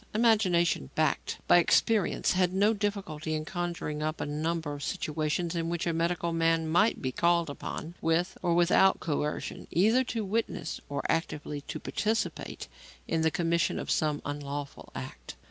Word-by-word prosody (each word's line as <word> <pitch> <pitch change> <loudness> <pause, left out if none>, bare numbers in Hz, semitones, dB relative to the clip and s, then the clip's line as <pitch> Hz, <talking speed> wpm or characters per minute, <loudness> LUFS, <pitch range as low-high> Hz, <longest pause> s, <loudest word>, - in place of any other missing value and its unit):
Imagination 190 - +3
backed - - 0
by 175 - +7
experience 210 +3 +2
had 185 -1 +2
no 205 +3 +4
difficulty 195 -7 -2
in 155 0 -3
conjuring 170 -4 -3
up 155 +1 -2
a - - -2
number 155 +1 -2
of 145 - -7
situations 155 +1 -1
in 165 0 -1
which 170 0 -2
a 170 - 0
medical 170 +1 0
man 165 -1 +2
might 175 +6 +2
be 130 - 0
called 170 +2 +2
upon, 160 +3 -6
with 170 +3 +1
or 170 -1 +2
without 175 +2 +4
coercion, 150 -2 -3
either 220 +9 +4
to 230 -4 -3
witness 225 +4 -2
or 140 - -3
actively 150 -3 -2
to - - -6
participate 220 +1 -2 0.4
in 165 - 0
the 160 - +4
commission 170 0 +1
of - - -3
some 150 -2 +1
unlawful 145 0 -5
act. - - -7
170 Hz, 160 wpm, -29 LUFS, 155-185 Hz, 0.4 s, by